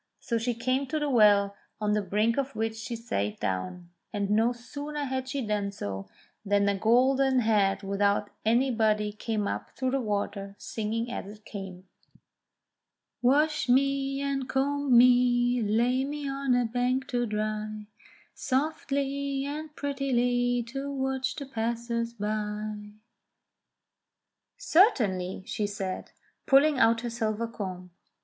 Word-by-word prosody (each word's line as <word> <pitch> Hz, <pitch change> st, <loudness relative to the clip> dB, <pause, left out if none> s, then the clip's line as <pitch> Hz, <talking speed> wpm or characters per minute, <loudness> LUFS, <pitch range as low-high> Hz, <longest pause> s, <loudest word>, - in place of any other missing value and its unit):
So 230 Hz, -2 st, -1 dB
she 235 Hz, +1 st, -1 dB
came 255 Hz, +4 st, 0 dB
to 310 Hz, -, -2 dB
the 295 Hz, -2 st, -1 dB
well, 205 Hz, -4 st, +5 dB, 0.2 s
on 210 Hz, -1 st, +1 dB
the 210 Hz, -, +2 dB
brink 210 Hz, +3 st, +1 dB
of 275 Hz, 0 st, -2 dB
which 220 Hz, 0 st, -1 dB
she 225 Hz, +2 st, -5 dB
sate 105 Hz, -, -3 dB
down, 95 Hz, -, -3 dB, 0.2 s
and 200 Hz, -1 st, -2 dB
no 225 Hz, +3 st, +3 dB
sooner 285 Hz, +5 st, -6 dB
had 260 Hz, -1 st, -3 dB
she 265 Hz, -1 st, -2 dB
done 205 Hz, -1 st, -1 dB
so, 95 Hz, -, -6 dB, 0.3 s
than 200 Hz, 0 st, +2 dB
a 200 Hz, -, +2 dB
golden 260 Hz, +5 st, +3 dB
head 205 Hz, -3 st, +2 dB
without 200 Hz, +1 st, +1 dB
any 240 Hz, +4 st, +3 dB
body 215 Hz, -2 st, +1 dB
came 215 Hz, -1 st, -2 dB
up -, -, -5 dB
through 260 Hz, -1 st, 0 dB
the 270 Hz, 0 st, 0 dB
water, 200 Hz, -2 st, -3 dB
singing 230 Hz, +2 st, -3 dB
as 220 Hz, -, -5 dB
it 210 Hz, +1 st, -12 dB
came: 190 Hz, -2 st, -8 dB, 1.3 s
"Wash 295 Hz, +3 st, +2 dB
me, 275 Hz, +1 st, +2 dB
and 275 Hz, -2 st, -2 dB
comb 275 Hz, -1 st, +2 dB
me, 245 Hz, 0 st, +5 dB
lay 235 Hz, +5 st, +2 dB
me 290 Hz, +1 st, -4 dB
on 275 Hz, -2 st, 0 dB
a 245 Hz, -1 st, +2 dB
bank 250 Hz, +3 st, 0 dB
to 240 Hz, -1 st, 0 dB
dry 215 Hz, 0 st, -3 dB, 0.5 s
Softly 275 Hz, -1 st, -1 dB
and 300 Hz, +1 st, -6 dB
prettily 245 Hz, -4 st, 0 dB
to 275 Hz, +3 st, -4 dB
watch 265 Hz, -1 st, -1 dB
the 280 Hz, -, -6 dB
passers 235 Hz, -1 st, -2 dB
by." 210 Hz, -1 st, -3 dB, 1.7 s
"Certainly," 215 Hz, -, +2 dB
she 210 Hz, 0 st, -2 dB
said, 195 Hz, -2 st, -4 dB, 0.4 s
pulling 275 Hz, +1 st, +5 dB
out 230 Hz, 0 st, +4 dB
her 240 Hz, -, -3 dB
silver 225 Hz, -1 st, -1 dB
comb. 185 Hz, -5 st, -6 dB
235 Hz, 140 wpm, -28 LUFS, 210-270 Hz, 1.7 s, well